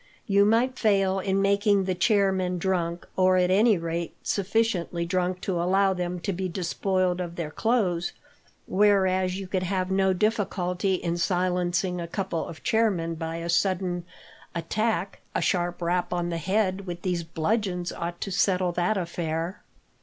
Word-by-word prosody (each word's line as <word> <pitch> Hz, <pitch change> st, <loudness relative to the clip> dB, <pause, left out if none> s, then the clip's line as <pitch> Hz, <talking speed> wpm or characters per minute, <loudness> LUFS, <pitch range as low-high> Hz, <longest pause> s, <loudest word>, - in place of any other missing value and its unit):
You 200 Hz, -1 st, +4 dB
might 235 Hz, +4 st, +2 dB
fail 195 Hz, -3 st, +2 dB
in 195 Hz, +1 st, 0 dB
making 200 Hz, 0 st, +3 dB
the 185 Hz, 0 st, 0 dB
chair 195 Hz, +1 st, +3 dB
men 185 Hz, -1 st, -1 dB
drunk, 175 Hz, -2 st, -1 dB
or 185 Hz, 0 st, +4 dB
at 180 Hz, 0 st, +3 dB
any 210 Hz, +2 st, +5 dB
rate 170 Hz, 0 st, -3 dB
sufficiently 195 Hz, -4 st, 0 dB
drunk 180 Hz, +1 st, -1 dB
to 180 Hz, -3 st, -1 dB
allow 190 Hz, +2 st, +3 dB
them 180 Hz, -1 st, -3 dB
to 200 Hz, +2 st, -2 dB
be 185 Hz, +1 st, -3 dB
despoiled 185 Hz, +1 st, 0 dB
of 170 Hz, -1 st, -5 dB
their 165 Hz, -3 st, -4 dB
clothes; 185 Hz, -5 st, 0 dB, 0.5 s
whereas 190 Hz, -2 st, +2 dB
you 195 Hz, -, -5 dB
could 185 Hz, 0 st, -1 dB
have 185 Hz, 0 st, -1 dB
no 190 Hz, 0 st, +3 dB
difficulty 190 Hz, -2 st, 0 dB
in 170 Hz, -1 st, -2 dB
silencing 180 Hz, 0 st, 0 dB
a 170 Hz, -, -4 dB
couple 170 Hz, -2 st, -3 dB
of 160 Hz, -, -10 dB
chair 225 Hz, 0 st, +3 dB
men 165 Hz, -4 st, -2 dB
by 165 Hz, 0 st, -4 dB
a 165 Hz, 0 st, -4 dB
sudden 180 Hz, 0 st, 0 dB, 0.5 s
attack 195 Hz, +2 st, -1 dB, 0.2 s
a -, -, +1 dB
sharp 175 Hz, -1 st, 0 dB
rap 175 Hz, +1 st, 0 dB
on 175 Hz, -1 st, -1 dB
the 170 Hz, -1 st, -2 dB
head 190 Hz, +2 st, 0 dB
with 175 Hz, -1 st, -6 dB
these 180 Hz, -2 st, 0 dB
bludgeons 180 Hz, +2 st, -1 dB
ought 170 Hz, 0 st, -5 dB
to 195 Hz, -, -3 dB
settle 185 Hz, -1 st, +2 dB
that 175 Hz, +5 st, 0 dB
affair." 170 Hz, 0 st, -3 dB
185 Hz, 165 wpm, -26 LUFS, 175-195 Hz, 0.5 s, any